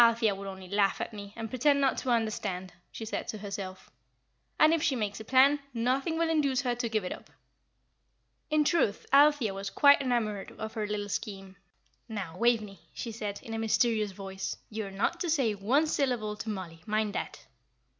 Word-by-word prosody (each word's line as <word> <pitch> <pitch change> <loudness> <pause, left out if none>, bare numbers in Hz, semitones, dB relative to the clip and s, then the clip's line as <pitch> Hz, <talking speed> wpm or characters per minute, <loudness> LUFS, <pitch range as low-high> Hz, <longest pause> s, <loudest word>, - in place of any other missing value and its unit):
"Althea 230 -2 +4
would 195 0 -7
only 190 -1 -8
laugh 200 +1 +2
at - - -4
me, 200 -1 -8
and 225 -1 -6
pretend 280 +3 +3
not 270 -2 +3
to 260 - -4
understand," 210 -6 -1 0.2
she 225 - -6
said 220 - -4
to 215 - -4
herself; 200 -2 -7 0.7
"and 310 +1 +6
if 330 - +1
she 285 -4 +2
makes 210 -3 -2
a - - -6
plan, 265 +5 +5 0.2
nothing 265 +7 0
will 335 0 +2
induce 280 -5 +2
her 245 -2 0
to 240 -1 -2
give 215 -2 0
it 180 - -4
up." - - -8 1.2
In 305 -1 +3
truth 290 - +1
Althea 285 -7 +5
was 195 +1 -4
quite 285 +5 +6
enamoured 225 -6 -1
of 220 0 -5
her 215 -2 -2
little 205 0 -3
scheme. 195 -2 -5 0.5
"Now, 195 -7 -5
Waveney," 220 -2 +1 0.2
she 230 - -4
said, 210 -2 -5
in 225 - -7
a 225 - -2
mysterious 220 -1 +2
voice, 195 0 -5
"you 215 -1 -3
are - - -7
not 200 - -1
to 345 - -1
say 270 -9 +2
one 235 +10 +2
syllable 245 -8 0
to 220 - -5
Mollie, 180 -5 -6
mind 215 -1 0
that!" - - -5
220 Hz, 195 wpm, -30 LUFS, 200-260 Hz, 1.2 s, and